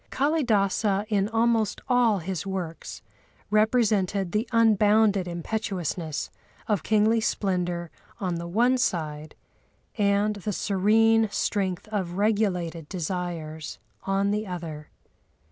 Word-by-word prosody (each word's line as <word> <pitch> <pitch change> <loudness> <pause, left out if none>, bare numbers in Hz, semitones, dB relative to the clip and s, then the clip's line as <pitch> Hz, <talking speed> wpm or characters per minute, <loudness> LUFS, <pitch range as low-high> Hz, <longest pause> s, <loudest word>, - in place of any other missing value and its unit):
Kâlidâsa 215 - +1
in 205 -1 +1
almost 225 -1 +1
all 245 -5 +3
his 180 -1 -4
works 185 -4 -6 0.5
represented 210 -4 +2
the 215 +5 -1
unbounded 215 -3 +4
impetuousness 175 -3 -3 0.4
of 205 -6 +1
kingly 220 +3 +2
splendour 180 -5 -1 0.3
on 185 -3 -1
the 170 0 -5
one 240 +8 +2
side 155 -7 -2 0.6
and 205 +1 +2
the 205 +1 -3
serene 220 +4 +3
strength 190 -2 -1
of 190 -5 -2
regulated 180 -6 0
desires 165 -3 -4 0.2
on 195 +1 0
the 210 +1 -2
other. 160 -4 -6
200 Hz, 105 wpm, -26 LUFS, 175-220 Hz, 0.6 s, unbounded